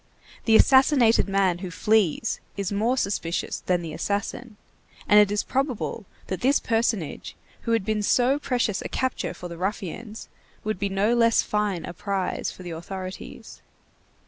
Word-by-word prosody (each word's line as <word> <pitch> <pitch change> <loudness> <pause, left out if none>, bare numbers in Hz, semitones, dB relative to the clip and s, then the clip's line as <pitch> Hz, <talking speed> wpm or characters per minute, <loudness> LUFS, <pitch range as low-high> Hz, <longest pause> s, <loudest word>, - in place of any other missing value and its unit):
The 225 - +5
assassinated 260 -4 +5
man 195 -3 +2
who 185 -1 -5
flees 210 +1 +1 0.2
is 200 -1 -2
more 225 +6 +1
suspicious 185 -7 -2
than 180 -1 +1
the 160 -2 -6
assassin, 210 +5 -3 0.5
and 210 - +7
it 205 -1 +5
is 205 - 0
probable 255 -6 -2 0.2
that 185 - -4
this 275 +3 +3
personage, 225 - -1 0.3
who - - +2
had 225 -4 +1
been 215 0 0
so 250 +6 +3
precious 245 -8 0
a - - -5
capture 260 -8 -2
for 180 - -7
the 170 -1 -9
ruffians, 210 +3 -4 0.4
would 215 -3 -2
be 200 - -1
no 200 +4 +1
less 230 -1 +4
fine 210 -5 -1
a - - -7
prize 195 +1 -2
for 185 - -12
the 175 - -6
authorities. 185 +3 -8
205 Hz, 160 wpm, -25 LUFS, 185-230 Hz, 0.5 s, and